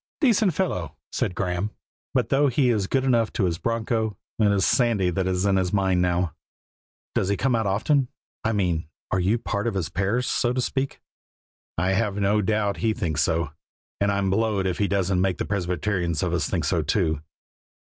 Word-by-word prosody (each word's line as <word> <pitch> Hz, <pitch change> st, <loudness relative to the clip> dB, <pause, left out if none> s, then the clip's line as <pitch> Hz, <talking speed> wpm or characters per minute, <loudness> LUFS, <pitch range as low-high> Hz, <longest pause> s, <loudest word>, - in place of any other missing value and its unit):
"Decent 220 Hz, -, +3 dB
fellow," 90 Hz, -, -2 dB, 0.2 s
said 90 Hz, -, -1 dB
Graeme; 90 Hz, +2 st, -1 dB, 0.5 s
"but 125 Hz, -3 st, +2 dB
though 140 Hz, +2 st, +4 dB
he 130 Hz, 0 st, +2 dB
is 105 Hz, -5 st, +1 dB
good 135 Hz, +4 st, +1 dB
enough 120 Hz, -4 st, +2 dB
to 110 Hz, -, 0 dB
his 85 Hz, -1 st, -1 dB
broncho, 110 Hz, -2 st, -1 dB, 0.2 s
it 105 Hz, -2 st, +4 dB
is 100 Hz, -1 st, +2 dB
Sandy 110 Hz, -7 st, +2 dB
that's 95 Hz, +1 st, 0 dB
in 100 Hz, -1 st, +3 dB
his 90 Hz, -1 st, 0 dB
mind 95 Hz, -3 st, +2 dB
now." 90 Hz, -2 st, +1 dB, 0.8 s
"Does 95 Hz, -, 0 dB
he 100 Hz, -, +1 dB
come 135 Hz, -1 st, +1 dB
out 110 Hz, -3 st, +1 dB
often? 125 Hz, +8 st, +2 dB, 0.4 s
I 110 Hz, -, +1 dB
mean, 85 Hz, -6 st, 0 dB, 0.2 s
are 95 Hz, -, +2 dB
you 95 Hz, +6 st, +2 dB
part 105 Hz, -2 st, -2 dB
of 115 Hz, -, -1 dB
his 85 Hz, -5 st, -1 dB
parish, 100 Hz, +8 st, 0 dB
so 120 Hz, 0 st, +1 dB
to 130 Hz, -, -1 dB
speak?" 135 Hz, +2 st, -2 dB, 0.8 s
"I 90 Hz, +3 st, +1 dB
have 105 Hz, 0 st, +1 dB
no 105 Hz, +1 st, +2 dB
doubt 105 Hz, 0 st, 0 dB
he 110 Hz, -1 st, +1 dB
thinks 80 Hz, -4 st, -1 dB
so; 80 Hz, -2 st, 0 dB, 0.5 s
and 100 Hz, 0 st, +2 dB
I'm 100 Hz, -1 st, 0 dB
blowed 105 Hz, -1 st, +1 dB
if 90 Hz, -2 st, -1 dB
he 100 Hz, -, +2 dB
doesn't 95 Hz, -2 st, +1 dB
make 95 Hz, -1 st, +1 dB
the -, -, -2 dB
Presbyterians 90 Hz, -3 st, -1 dB
of -, -, -1 dB
us -, -, 0 dB
think -, -, -1 dB
so -, -, +1 dB
too." 80 Hz, -2 st, 0 dB
100 Hz, 195 wpm, -25 LUFS, 90-115 Hz, 0.8 s, though